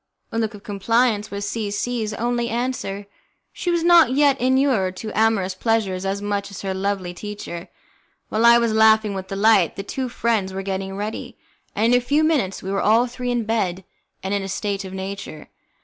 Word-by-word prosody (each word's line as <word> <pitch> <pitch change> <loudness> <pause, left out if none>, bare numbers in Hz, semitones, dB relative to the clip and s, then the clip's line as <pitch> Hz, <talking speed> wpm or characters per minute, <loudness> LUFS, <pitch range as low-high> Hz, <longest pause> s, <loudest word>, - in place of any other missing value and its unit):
A 225 - -1
look 220 -1 -1
of 205 - -13
compliance 215 +1 +1
was 200 0 -4
C 215 0 -3
C 225 +3 -2
's 215 - -3
only 240 +1 -1
answer; 230 -4 -3 0.5
she 355 - -3
was 340 -1 +1
not 340 -7 +6
yet 280 -1 +3
inured 255 -8 +2
to 215 +2 -5
amorous 215 -4 +2
pleasures 195 -2 -1
as 200 +1 -2
much 200 -1 -2
as 200 - -9
her 190 -1 -2
lovely 190 -2 -2
teacher. 195 -2 -7 0.6
While 220 +2 0
I 235 0 +8
was 235 -2 +1
laughing 220 -1 +4
with 190 -1 -5
delight, 195 -2 +3
the 195 - -5
two 255 +5 -4
friends 220 -5 0
were 195 0 -4
getting 195 0 -4
ready, 210 +2 -5 0.4
and 225 +4 +3
in - - +7
a - - -9
few 290 +5 +2
minutes 280 - 0
we 190 - -4
were 195 - 0
all 225 +3 +4
three 250 0 -5
in 240 -1 0
bed, 195 -5 -1 0.4
and 190 +1 -2
in 200 - 0
a 195 - -5
state 200 0 -2
of 190 - -8
nature. 190 -5 -7
210 Hz, 200 wpm, -22 LUFS, 195-235 Hz, 0.6 s, I